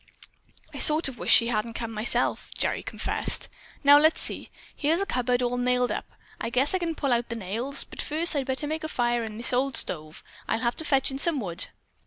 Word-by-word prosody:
"I - - -7
sort 305 +1 +6
of 255 - -11
wish - - -1
she 230 -1 +7
hadn't 225 0 -2
come, 230 -1 -4
myself," 220 +1 +1
Gerry - - +1
confessed. - - -1 0.4
"Now, 285 +1 +8
let's 315 +2 +3
see. - - -6 0.3
Here's 320 +3 +1
a 395 - 0
cupboard 250 -4 0
all 245 0 -1
nailed 250 0 +1
up. - - -4 0.3
I - - -3
guess 260 +6 +1
I 375 - +1
can 335 -2 -3
pull 275 -4 0
out 235 0 -1
the 235 - -4
nails, 230 +7 -3
but - - -7
first 315 +2 0
I'd 275 -2 -1
better 265 +3 -1
make 315 +2 -4
a - - -2
fire 240 -4 0
in 215 -1 -7
this 235 +2 -1
old 260 +1 +1
stove. 155 -2 -3 0.2
I'll - - 0
have 235 -1 0
to 320 - -4
fetch 270 -2 +2
in 270 - -5
some 320 -1 +1
wood." 180 -4 -5
250 Hz, 225 wpm, -26 LUFS, 235-290 Hz, 0.4 s, Now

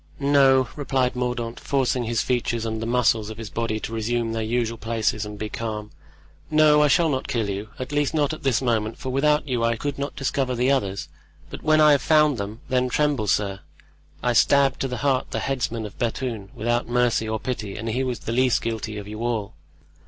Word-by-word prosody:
"No," 135 -2 +4
replied 130 -3 0
Mordaunt, 125 -2 -3
forcing 130 -3 0
his 115 0 0
features 120 -2 -1
and 110 0 -3
the 115 - -3
muscles 115 -3 +2
of 110 - -8
his 110 -3 -7
body 115 -1 -2
to 115 - -5
resume 115 +1 -1
their 115 - -2
usual 115 +1 -1
places 110 -1 -1
and 105 0 -8
be 110 - -3
calm; 105 -1 -5 0.6
"no, 150 -1 +5
I 150 - +5
shall 165 +4 +4
not 135 -4 -1
kill 120 -6 -1
you; 100 +2 -4
at 130 +2 -6
least 145 -1 +1
not 150 -1 +1
at 155 - -8
this 135 -2 +1
moment, 110 -2 0
for 130 - -5
without 150 +3 +2
you 125 -3 0
I 115 0 +2
could 140 +4 -4
not 140 +1 -3
discover 135 -1 -1
the 125 +3 +2
others. 100 - -1 0.4
But - - -7
when 155 0 +3
I 150 -1 +7
have 140 -2 +4
found 150 -4 +3
them, 105 +3 -5
then 125 0 +1
tremble, 145 -5 +1
sir. 100 -2 0 0.6
I 125 - +2
stabbed 135 +3 +4
to 135 - -1
the 125 -1 -4
heart 135 -2 +1
the - - -3
headsman 120 -4 -2
of 105 - -10
Bethune, 115 -4 -3
without 120 +2 0
mercy 120 -2 +1
or 110 0 -1
pity, 110 -6 -4
and 110 - -5
he 125 +4 0
was 125 -2 -3
the - - -4
least 125 +1 +2
guilty 110 -2 -3
of 100 -1 -7
you 105 +2 -6
all." 115 -4 -2
120 Hz, 215 wpm, -24 LUFS, 110-135 Hz, 0.6 s, I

